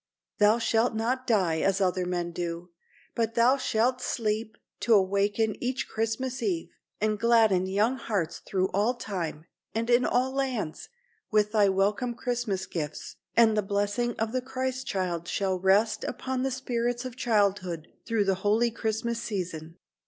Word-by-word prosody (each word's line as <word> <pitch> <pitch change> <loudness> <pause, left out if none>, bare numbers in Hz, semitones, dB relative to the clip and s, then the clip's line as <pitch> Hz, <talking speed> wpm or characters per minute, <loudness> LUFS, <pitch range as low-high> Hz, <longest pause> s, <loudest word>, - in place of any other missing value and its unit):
Thou 210 +2 +5
shalt 230 0 +1
not 250 +4 -1
die 185 -8 +2
as 195 +3 +1
other 185 -1 +1
men 175 -1 -2
do, 170 0 -5 0.4
but 230 -1 -1
thou 240 +3 +5
shalt 255 -1 +1
sleep, 220 -2 -2 0.2
to 230 - +4
awaken 200 +2 +2
each 255 +2 -1
Christmas 240 +4 -2
eve, 350 -4 -1 0.3
and 215 -1 0
gladden 220 -5 +4
young 210 +7 +1
hearts 200 -9 -2
through 190 -1 -1
all 215 +6 +1
time, 170 -9 -4 0.3
and 230 +2 0
in 240 +1 +5
all 255 +2 +1
lands, 260 - -3 0.4
with 210 -1 +2
thy 210 -3 +4
welcome 210 +6 +1
Christmas 240 -6 -2
gifts, 155 -5 -5 0.2
and 225 -2 +6
the 210 - +2
blessing 205 +4 -1
of 220 0 -1
the 255 +1 -1
Christ 260 0 -3
child 175 -3 -2
shall 190 -2 -1
rest 195 +4 +3
upon 260 -1 -3
the 270 - +1
spirits 245 -1 -2
of 255 -2 -6
childhood 200 -9 0 0.2
through 225 -3 +1
the 195 - +3
holy 220 +4 +2
Christmas 230 +1 -2
season." 175 -7 -5
220 Hz, 155 wpm, -28 LUFS, 190-240 Hz, 0.4 s, and